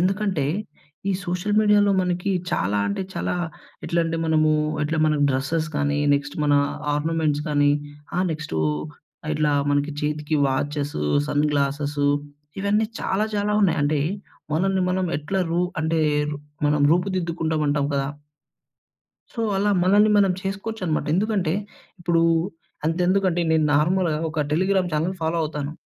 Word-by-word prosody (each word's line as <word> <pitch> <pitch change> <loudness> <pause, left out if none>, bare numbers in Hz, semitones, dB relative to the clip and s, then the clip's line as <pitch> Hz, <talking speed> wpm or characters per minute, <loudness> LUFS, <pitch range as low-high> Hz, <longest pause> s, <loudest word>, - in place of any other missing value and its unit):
ఎందుకంటే, 190 -4 0 0.7
ఈ - - +2
సోషల్ 180 +4 -1
మీడియాలో 210 -1 +4
మనకి 180 +2 -1 0.2
చాలా 100 +3 0
అంటే 100 - -2
చాలా - - -1 0.5
ఎట్లంటే 165 -1 0
మనము 155 -1 +3 0.3
ఎట్లా 160 +2 -1
మన 155 - +2 0.2
డ్రెస్సెస్ 140 +5 -1
కానీ, 145 0 0 0.2
నెక్స్ట్ 145 0 -3
మన 145 -1 +3 0.4
ఆర్నమెంట్స్ 150 -1 0
కానీ, 145 -1 +3 0.5
ఆహ్, 185 +1 +2
నెక్స్టూ 155 - -3 0.7
ఇట్లా 150 -1 +1 0.2
మనకి 145 +1 0
చేతికి 150 +1 -1
వాచెసు, 145 - -2 0.2
సన్‌గ్లాసెసు 145 0 0 0.5
ఇవన్నీ 205 +2 +2 0.2
చాలా 200 +3 0
చాలా 205 +1 0
ఉన్నాయి. 165 -4 +3
అంటే, 150 0 +1 0.5
మనల్ని 190 +3 +1
మనం 185 0 0
ఎట్లా 150 +6 -3
రూ 170 +1 +1 0.2
అంటే 160 +1 +1 0.3
రు 150 - -4 0.3
మనం 150 0 +2
రూపుదిద్దుకుంటాం 170 -3 -1
అంటాం 145 -1 +1
కదా! 135 0 0 1.3
సో 230 - -3 0.2
అలా 205 +1 +2
మనల్ని 205 +3 +5
మనం 195 -2 +4
చేసుకోవచ్చన్నమాట. 195 -5 -3
ఎందుకంటే, 195 -4 +1 0.5
ఇప్పుడు 170 -1 +2 0.6
అంతెందుకంటే 180 +2 +1
నేను 160 -1 +3
నార్మల్‌గా 165 +1 +2
ఒక 155 -2 0
టెలిగ్రామ్ 185 +1 +1
చానెల్ 165 +5 0
ఫాలో 160 +1 0
అవుతాను. 150 -1 -4
160 Hz, 130 wpm, -23 LUFS, 150-185 Hz, 1.3 s, మనల్ని